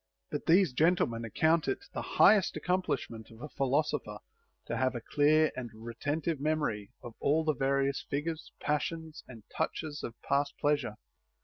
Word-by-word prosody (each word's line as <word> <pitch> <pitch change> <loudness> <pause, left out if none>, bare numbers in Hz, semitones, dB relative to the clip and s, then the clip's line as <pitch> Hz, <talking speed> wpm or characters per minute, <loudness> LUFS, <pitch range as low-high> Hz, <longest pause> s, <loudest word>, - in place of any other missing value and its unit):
But - - -4
these 175 -3 +5
gentlemen 130 -6 +2
ac 115 - -9
count 160 0 +3
it 400 - -2
the - - -3
highest 205 -4 +4
accomplishment 140 -11 -2
of 115 - -15
a 150 - -6
philosopher 140 -5 0 0.5
to - - -3
have 130 0 +1
a - - -2
clear 155 +1 +4
and 125 -2 -5
retentive 145 +8 -3
memory 145 -9 -1
of 120 - -8
all 155 +3 +2
the 155 -1 +2
various 135 +1 +1
figures, 155 +3 -3
passions, 160 +2 -2
and 115 -4 -12
touches 155 -2 -2
of 115 0 -6
past 140 +1 0
pleasure. 145 -7 0
145 Hz, 155 wpm, -31 LUFS, 125-160 Hz, 0.5 s, these